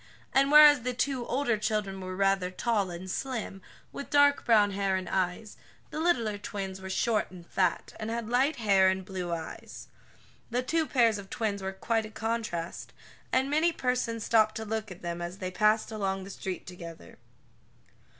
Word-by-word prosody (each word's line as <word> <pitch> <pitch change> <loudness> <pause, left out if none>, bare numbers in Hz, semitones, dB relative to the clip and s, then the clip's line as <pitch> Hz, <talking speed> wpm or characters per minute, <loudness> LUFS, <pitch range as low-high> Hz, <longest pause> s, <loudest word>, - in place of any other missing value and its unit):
And, 275 +1 +4
whereas 295 -2 +9
the 250 +1 -3
two 255 -1 -1
older 240 -3 0
children 210 -3 -2
were 185 0 -5
rather 195 -1 +2
tall 205 0 0
and 175 +2 -7
slim, 220 -2 -4 0.3
with 280 - -7
dark 285 0 +4
brown 210 -4 +4
hair 195 -1 0
and 185 0 -3
eyes, 190 +3 -2 0.3
the - - -4
littler 235 -12 +1
twins 195 -2 -5
were 190 - -7
short 215 +3 0
and 180 -2 -12
fat, 180 0 -1
and 215 0 -4
had 230 -1 -3
light 260 +6 +2
hair 195 -4 +4
and 190 0 -2
blue 185 -2 -4
eyes. 165 -1 -7 0.6
The 245 +2 -1
two 320 +4 0
pairs 230 -6 +3
of 195 -1 -10
twins 205 -3 -2
were 190 0 -3
quite 220 +3 -1
a - - -12
contrast, 220 -7 -4 0.4
and 260 +1 +2
many 310 +4 +2
persons 250 -5 -1
stopped 215 -1 +3
to 220 - -4
look 220 0 -3
at 180 -1 -11
them 170 0 -4
as 175 +2 -5
they 185 -2 -4
passed 215 +3 +2
along 195 -3 -2
the 195 - -8
street 190 -1 -5
together. 170 - -10
215 Hz, 180 wpm, -29 LUFS, 190-235 Hz, 0.6 s, whereas